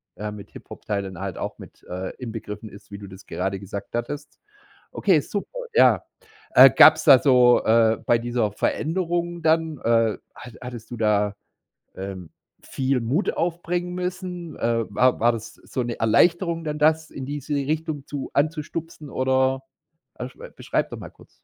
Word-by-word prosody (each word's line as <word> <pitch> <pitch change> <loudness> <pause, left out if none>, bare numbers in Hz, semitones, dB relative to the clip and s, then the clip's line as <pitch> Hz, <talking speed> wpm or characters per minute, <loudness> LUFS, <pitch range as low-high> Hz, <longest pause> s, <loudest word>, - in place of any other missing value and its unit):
äh, 105 +1 -5
mit 105 -1 -11
Hip-Hop-Teilen 100 -4 -6
halt 95 -2 -5
auch - - -5
mit, - - -14
äh, 95 +1 -4
inbegriffen 110 -3 -7
ist, 100 +1 -15
wie 100 - -7
du 100 -1 -10
das 95 0 -13
gerade 95 0 -3
gesagt 100 +2 -8
hattest. 145 +5 -5 0.5
Okay, 180 -7 +3
super, 205 - -5 0.2
ja. - - +5 0.5
Äh, - - +10
gab's - - +7
da 130 - +9
so, 125 -3 +5
äh 115 0 +4
bei 120 - +4
dieser 120 -2 -1
Veränderung 175 - -1
dann, 160 -2 +1
äh, 115 -2 +2 0.2
hatt 120 -2 -11
hattest 120 -3 -8
du 120 - -6
da, 105 -2 +1 0.6
ähm, 95 -3 -7 0.4
viel 135 -1 -1
Mut 130 - 0
aufbringen 175 +1 -2
müssen? 180 -2 -5
Äh, 115 -1 0
war 125 +4 +3
war 120 +1 +4
das 115 0 -7
so 125 - -5
'ne 120 -1 -4
Erleichterung 165 - +2
dann, 150 -1 -3
das 155 +1 +2
in 130 -1 -7
diese 145 +1 -4
Richtung 150 0 -2
zu 145 -2 -5
anzustupsen 155 +1 -2
oder, 130 0 +1 0.5
äh, 125 - -4
sch 125 - -21 0.2
beschreib - - -1
doch - - -7
mal - - -9
kurz. - - -20
130 Hz, 160 wpm, -24 LUFS, 110-160 Hz, 0.6 s, Äh